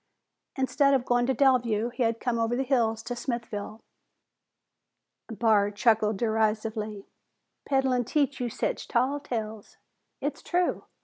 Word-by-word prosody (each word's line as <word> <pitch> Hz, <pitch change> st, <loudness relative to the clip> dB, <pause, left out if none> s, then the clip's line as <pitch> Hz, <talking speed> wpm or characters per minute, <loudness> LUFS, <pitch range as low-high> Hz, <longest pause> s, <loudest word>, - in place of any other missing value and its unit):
Instead 275 Hz, +1 st, +3 dB
of 255 Hz, -2 st, 0 dB
going 245 Hz, 0 st, +2 dB
to 265 Hz, -, +1 dB
Delview, 240 Hz, -4 st, +2 dB
he 250 Hz, -, -5 dB
had 230 Hz, -1 st, +1 dB
come 240 Hz, -2 st, -1 dB
over 230 Hz, +1 st, +1 dB
the 265 Hz, -, 0 dB
hills 230 Hz, -4 st, +1 dB
to 245 Hz, -, -4 dB
Smithville. 225 Hz, -3 st, -5 dB, 1.5 s
Barr 220 Hz, -3 st, +3 dB
chuckled 215 Hz, 0 st, +2 dB
derisively. 220 Hz, -1 st, -1 dB, 0.6 s
"Peddlin' 265 Hz, -2 st, +2 dB
teach 280 Hz, +1 st, 0 dB
you 245 Hz, -1 st, -1 dB
sech -, -, -2 dB
tall 260 Hz, +4 st, +1 dB
tales?" 220 Hz, -6 st, -6 dB, 0.4 s
"It's 290 Hz, +1 st, -3 dB
true." 355 Hz, 0 st, 0 dB
235 Hz, 130 wpm, -27 LUFS, 220-260 Hz, 1.5 s, Instead